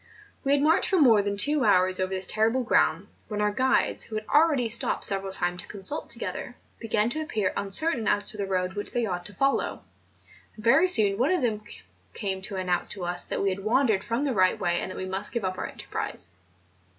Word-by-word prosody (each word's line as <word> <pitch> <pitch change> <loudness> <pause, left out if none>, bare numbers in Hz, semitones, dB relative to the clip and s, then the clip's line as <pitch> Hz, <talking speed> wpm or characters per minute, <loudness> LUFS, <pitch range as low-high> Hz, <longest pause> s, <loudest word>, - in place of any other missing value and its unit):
We 275 - +2
had 285 0 +2
marched 320 +2 +3
for 380 - +2
more 230 -8 +6
than 200 0 -3
two 290 +6 +2
hours 185 -3 +3
over 185 0 0
this 190 0 -1
terrible 225 +6 +1
ground, 195 -4 +1 0.2
when 210 -1 -4
our 210 0 +1
guides, 255 +5 +1
who 220 - -8
had 215 0 -4
already 295 -5 +3
stopped 235 +1 0
several 195 -1 +3
times 180 -1 -2
to - - -15
consult 205 +9 0
together, - - -4 0.2
began 220 0 0
to 310 - -2
appear 215 -10 -2
uncertain 225 +4 0
as 205 - +2
to 215 - -3
the 200 -1 -3
road 185 -1 -1
which 205 +1 -5
they 240 -1 0
ought 180 -3 -4
to 205 - -13
follow; 275 +6 0 0.7
and 215 - -12
very 315 +10 +5
soon 210 - +3
one 265 +7 +2
of 360 -6 +1
them 215 -3 -1 0.5
came 195 -3 -3
to 195 +1 -5
an¬ 185 -1 -3
nounce 180 -1 0
to 195 -4 -5
us 175 0 0
that - - -3
we 200 - +2
had 190 +1 -3
wandered 220 -3 +2
from 235 +4 -2
the 280 -3 0
right 185 -3 +2
way, 175 -2 0
and - - -4
that - - -8
we 185 - -4
must 190 +1 -1
give 235 -5 -2
up 185 0 -3
our - - -3
enterprise. - - -5
210 Hz, 230 wpm, -26 LUFS, 190-245 Hz, 0.7 s, more